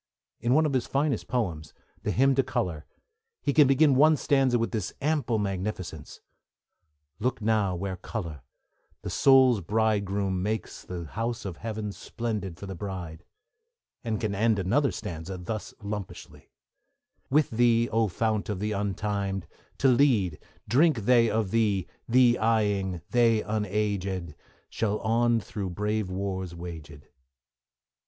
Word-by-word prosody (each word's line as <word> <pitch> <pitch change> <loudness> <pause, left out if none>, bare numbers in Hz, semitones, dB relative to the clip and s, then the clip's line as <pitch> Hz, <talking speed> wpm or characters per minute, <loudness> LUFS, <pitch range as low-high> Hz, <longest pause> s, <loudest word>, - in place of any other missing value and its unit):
In 120 +3 +2
one 155 +1 +4
of 150 - 0
the 130 - +2
finest 140 +3 -1
of - - -34
his - - -19
poems, 85 -11 -2 0.3
the - - -3
Hymn 135 +2 +3
to 135 - +3
Colour, 115 - -3 0.6
he 140 - +1
can 150 -2 +6
begin 135 +2 +5
one 150 +4 +5
stanza 135 -4 +2
with 115 0 -1
this 110 -7 -3
ample 145 -5 0
magnificence: 95 -6 -4 1.0
Look 125 +4 -1
now 105 -4 +1
where 95 +1 -4
Colour, 85 - -6 0.6
the - - -4
soul's 130 -5 +5
bridegroom, 100 -1 0
makes 110 +3 -3
The 90 -2 -6
house 115 +7 -4
of 90 -3 -5
heaven 110 -2 -4
splendid 105 -5 -4
for 100 - -8
the 95 - -6
bride; 90 -3 -6 0.8
and 110 -3 -2
can 110 -3 -1
end 110 +2 +2
another 120 +10 +2
stanza 95 -4 -6
thus 105 +4 -5
lumpishly: 100 -2 -7 0.8
With 150 +2 +3
thee, 115 0 +3
O 115 0 +2
fount 110 +3 -1
of 105 -3 -2
the 105 +2 -2
Untimed! 100 -1 -2 0.3
to 135 - +3
lead, 120 - +3 0.3
Drink 145 -1 +3
they 120 -1 +5
of 110 -4 -1
thee, 105 -5 +2 0.2
thee 120 0 +5
eyeing, 105 -6 +1
they 115 -3 +3
unaged 100 -5 -2 0.3
Shall 105 -1 -1
on 115 +1 +2
through 100 -2 -5
brave 105 +2 -2
wars 95 -2 -3
waged. 80 -4 -9
105 Hz, 145 wpm, -27 LUFS, 95-120 Hz, 1.0 s, can